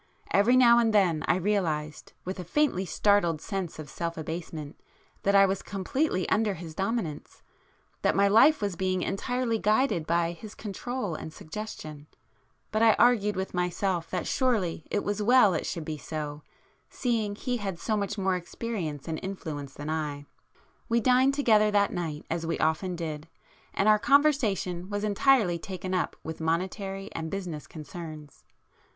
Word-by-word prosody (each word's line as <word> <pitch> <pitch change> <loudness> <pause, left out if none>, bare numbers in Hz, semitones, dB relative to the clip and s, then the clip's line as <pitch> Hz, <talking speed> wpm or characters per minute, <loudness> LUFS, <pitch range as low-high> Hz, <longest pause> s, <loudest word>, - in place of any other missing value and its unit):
Every 230 +6 +5
now 235 -2 +7
and 225 -2 +2
then 175 -6 +3
I - - +4
realized, 165 -6 -1
with 185 +1 -4
a - - -4
faintly 190 - +1
startled 175 -3 +2
sense 190 -1 -4
of 155 -1 -7
self 170 +4 -4
abasement, 160 -2 -6 0.4
that 200 0 +2
I 195 0 +8
was 190 0 -1
completely 195 - -1
under 210 -2 +2
his 160 -1 -8
dominance,—that 195 -5 -4
my 200 0 +4
life 230 +6 +5
was 200 -3 -1
being 185 +1 0
entirely 245 +2 -1
guided 210 - +2
by 170 0 +1
his 205 +5 -10
control 215 0 -4
and 160 - -6
suggestion,—but 155 +3 -8
I 225 -1 +7
argued 215 -4 +3
with 190 +1 -3
myself 180 -1 -1
that 180 - -2
surely 215 - 0
it 205 - -1
was 205 +1 -2
well 235 -2 +5
it 160 - -2
should 165 -3 -4
be 155 -1 -4
so, 150 -1 -5 0.5
seeing 225 -5 -1
he 245 +3 -2
had 195 -5 -4
so 215 +5 -1
much 205 0 -2
more 190 -1 +1
experience 175 - -5
and 160 -1 -3
influence 155 -8 -6
than 145 +2 -5
I. 150 -2 -3 0.6
We 235 0 +3
dined 255 +3 +4
together 215 -7 +4
that 205 -1 +2
night 160 -4 -4
as 165 0 -2
we 165 0 -1
often 160 +4 0
did, 160 -2 -5 0.4
and 195 - 0
our 215 0 +6
conversation 215 - +2
was 205 0 -2
entirely 210 -4 +3
taken 185 +1 -5
up 180 - 0
with 160 0 -6
monetary 195 +4 -2
and 160 0 -4
business 175 -6 -5
concerns. 155 -2 -9
190 Hz, 160 wpm, -28 LUFS, 165-215 Hz, 0.6 s, I